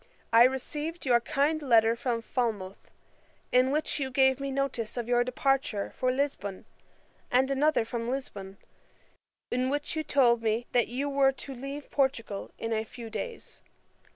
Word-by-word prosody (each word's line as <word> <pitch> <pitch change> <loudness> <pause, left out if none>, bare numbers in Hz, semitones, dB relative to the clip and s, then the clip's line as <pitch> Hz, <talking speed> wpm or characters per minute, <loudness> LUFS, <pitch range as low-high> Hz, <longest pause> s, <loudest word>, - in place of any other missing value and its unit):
I 230 +1 +9
received 295 +6 -3
your 245 -2 +5
kind 290 +6 0
letter 230 -4 +4
from 235 -1 -2
Falmouth, 215 -7 -3 0.6
in 255 +1 +4
which 300 +1 -1
you 270 -2 -1
gave 265 0 +3
me 275 0 -3
notice 265 -4 -2
of 235 -1 -3
your 245 0 +3
departure 255 -4 0
for 255 -1 +1
Lisbon, 255 -8 -2 0.6
and 260 +2 +3
another 280 -3 +2
from 230 0 -4
Lisbon, 200 -7 -5 0.9
in 255 +1 +1
which 290 +3 -2
you 315 - -1
told 240 -6 +3
me, 225 +1 0
that 240 -2 +3
you 260 +5 -2
were 275 -1 +3
to 270 +1 -8
leave 275 +3 -7
Portugal 245 -7 -1
in 225 0 -3
a 220 0 0
few 225 0 -10
days. 470 - -6
255 Hz, 155 wpm, -29 LUFS, 230-275 Hz, 0.9 s, I